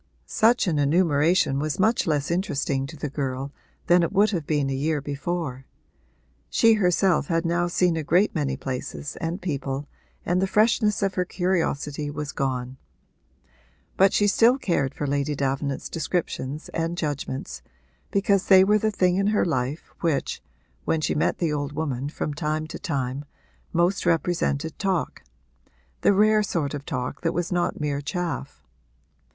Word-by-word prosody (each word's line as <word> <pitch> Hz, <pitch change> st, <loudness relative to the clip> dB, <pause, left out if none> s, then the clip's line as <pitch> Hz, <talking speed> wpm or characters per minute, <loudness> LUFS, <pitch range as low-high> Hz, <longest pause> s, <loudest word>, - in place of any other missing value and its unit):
Such 235 Hz, +3 st, +3 dB
an 160 Hz, -5 st, 0 dB
enumeration 150 Hz, -1 st, +3 dB
was 155 Hz, +2 st, -2 dB
much 220 Hz, +2 st, +2 dB
less 150 Hz, 0 st, 0 dB
interesting 140 Hz, -6 st, -1 dB
to 155 Hz, +2 st, -10 dB
the 150 Hz, -, -3 dB
girl 135 Hz, -1 st, -3 dB, 0.3 s
than 175 Hz, 0 st, +5 dB
it 170 Hz, -, 0 dB
would 205 Hz, +2 st, +3 dB
have 170 Hz, -7 st, -3 dB
been 145 Hz, -3 st, +1 dB
a 135 Hz, -, -1 dB
year 150 Hz, +3 st, 0 dB
before: 140 Hz, -1 st, -4 dB, 0.8 s
she 230 Hz, -1 st, +5 dB
herself 180 Hz, -5 st, +2 dB
had 165 Hz, 0 st, 0 dB
now 175 Hz, +1 st, +1 dB
seen 175 Hz, 0 st, +2 dB
a 160 Hz, -, -1 dB
great 180 Hz, +8 st, +3 dB
many 140 Hz, -5 st, -1 dB
places 130 Hz, +2 st, -5 dB
and 165 Hz, +3 st, -3 dB
people 140 Hz, -4 st, -3 dB, 0.4 s
and 180 Hz, +2 st, +1 dB
the 190 Hz, -, +2 dB
freshness 210 Hz, 0 st, +2 dB
of 195 Hz, -1 st, +1 dB
her 180 Hz, -, +1 dB
curiosity 160 Hz, -5 st, -1 dB
was 150 Hz, 0 st, -4 dB
gone. 130 Hz, -2 st, -3 dB, 1.2 s
But 195 Hz, 0 st, +5 dB
she 205 Hz, -, +2 dB
still 230 Hz, +5 st, +4 dB
cared 170 Hz, -, -1 dB
for 145 Hz, -, -3 dB
Lady 145 Hz, +1 st, 0 dB
Davenant's 140 Hz, 0 st, -2 dB
descriptions 155 Hz, -3 st, -3 dB
and 165 Hz, +1 st, -2 dB
judgments, 145 Hz, -4 st, -4 dB, 0.5 s
because 200 Hz, -1 st, +1 dB
they 190 Hz, -1 st, +8 dB
were 210 Hz, +2 st, +3 dB
the 220 Hz, -, +1 dB
thing 185 Hz, -3 st, +2 dB
in 195 Hz, +1 st, +2 dB
her 210 Hz, 0 st, +2 dB
life 135 Hz, -1 st, -2 dB
which 160 Hz, -5 st, -1 dB, 0.4 s
(when 160 Hz, -, +1 dB
she -, -, 0 dB
met 150 Hz, -, +1 dB
the 165 Hz, -4 st, 0 dB
old 145 Hz, -1 st, -3 dB
woman 140 Hz, -3 st, -2 dB
from 150 Hz, -1 st, -3 dB
time 155 Hz, 0 st, -2 dB
to -, -, -7 dB
time) 140 Hz, -6 st, -2 dB, 0.5 s
most 175 Hz, +2 st, +1 dB
represented 165 Hz, -3 st, 0 dB
talk 190 Hz, -4 st, -1 dB, 0.8 s
the -, -, +5 dB
rare 215 Hz, +2 st, +4 dB
sort 165 Hz, -8 st, -1 dB
of 145 Hz, -1 st, -6 dB
talk 125 Hz, -5 st, -3 dB
that 165 Hz, -, -1 dB
was 175 Hz, +1 st, -2 dB
not 175 Hz, -1 st, 0 dB
mere 145 Hz, -2 st, -1 dB
chaff. 145 Hz, -, -4 dB
160 Hz, 160 wpm, -25 LUFS, 140-185 Hz, 1.2 s, they